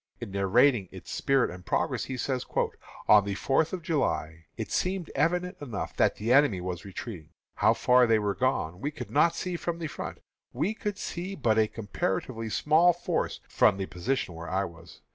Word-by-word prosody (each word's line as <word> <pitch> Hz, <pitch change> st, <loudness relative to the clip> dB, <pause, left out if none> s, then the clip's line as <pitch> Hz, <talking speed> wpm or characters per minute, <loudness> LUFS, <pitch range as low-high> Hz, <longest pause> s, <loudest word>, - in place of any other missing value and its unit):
In 120 Hz, -5 st, -7 dB
narrating 100 Hz, +2 st, +3 dB
its -, -, -10 dB
spirit 135 Hz, -2 st, +2 dB
and 90 Hz, 0 st, -10 dB
progress, -, -, 0 dB
he 130 Hz, -, -5 dB
says: 130 Hz, +1 st, -1 dB, 0.6 s
"On 105 Hz, -1 st, +7 dB
the 100 Hz, 0 st, -3 dB
fourth 135 Hz, +9 st, +1 dB
of 180 Hz, -3 st, -5 dB
July 85 Hz, -, -1 dB
it -, -, -5 dB
seemed 185 Hz, -2 st, -1 dB
evident 180 Hz, +3 st, 0 dB
enough 120 Hz, -8 st, -5 dB
that -, -, +3 dB
the 115 Hz, +4 st, +1 dB
enemy 135 Hz, -9 st, +4 dB
were 90 Hz, 0 st, -3 dB
retreating. 95 Hz, -4 st, -8 dB, 0.3 s
How -, -, +4 dB
far 125 Hz, 0 st, +4 dB
they 115 Hz, -1 st, +4 dB
were 105 Hz, -2 st, 0 dB
gone 95 Hz, -8 st, -1 dB
we 145 Hz, -, -1 dB
could 150 Hz, -, -8 dB
not 165 Hz, +3 st, +4 dB
see 180 Hz, +1 st, -3 dB
from 170 Hz, 0 st, -3 dB
the 170 Hz, -, -5 dB
front. 150 Hz, -, -6 dB, 0.4 s
We 200 Hz, +6 st, 0 dB
could 210 Hz, -3 st, -4 dB
see 185 Hz, +3 st, -5 dB
but 110 Hz, -, +2 dB
a 110 Hz, -, +4 dB
comparatively 110 Hz, +2 st, -3 dB
small 160 Hz, +9 st, +4 dB
force 175 Hz, -, -2 dB
from 95 Hz, -, +3 dB
the 95 Hz, -, -2 dB
position 95 Hz, +2 st, -2 dB
where 85 Hz, +1 st, -7 dB
I 95 Hz, +2 st, 0 dB
was. 85 Hz, 0 st, -12 dB
120 Hz, 190 wpm, -28 LUFS, 95-155 Hz, 0.6 s, On